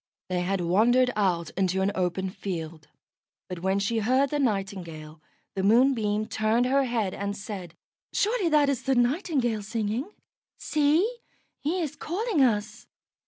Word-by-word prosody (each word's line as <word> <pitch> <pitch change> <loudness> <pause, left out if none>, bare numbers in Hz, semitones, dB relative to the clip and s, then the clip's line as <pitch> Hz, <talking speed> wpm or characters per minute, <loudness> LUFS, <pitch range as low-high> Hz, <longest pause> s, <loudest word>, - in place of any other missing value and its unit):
They 180 -1 0
had 190 +1 -1
wandered 235 +9 +3
out 180 -5 0
into 190 0 0
an 200 - +1
open 185 0 -1
field, 170 -6 -6 0.6
but 180 -2 -6
when 190 +2 0
she 200 +3 0
heard 255 +5 +2
the 295 - 0
Nightingale, 185 - -3 0.3
the 190 - -2
Moonbeam 215 -1 +3
turned 220 +3 +1
her 270 +2 +2
head 225 -6 -1
and 200 0 -4
said: 190 -5 -7 0.4
"Surely 420 -4 +1
that 300 -2 +4
is 280 -3 0
the 265 - +1
Nightingale 245 - +1
singing. 220 - -2 0.5
See! 315 +11 +1 0.4
he 340 +5 -1
is 300 - -4
calling 385 - -1
us." 215 -1 0
215 Hz, 145 wpm, -27 LUFS, 190-270 Hz, 0.6 s, that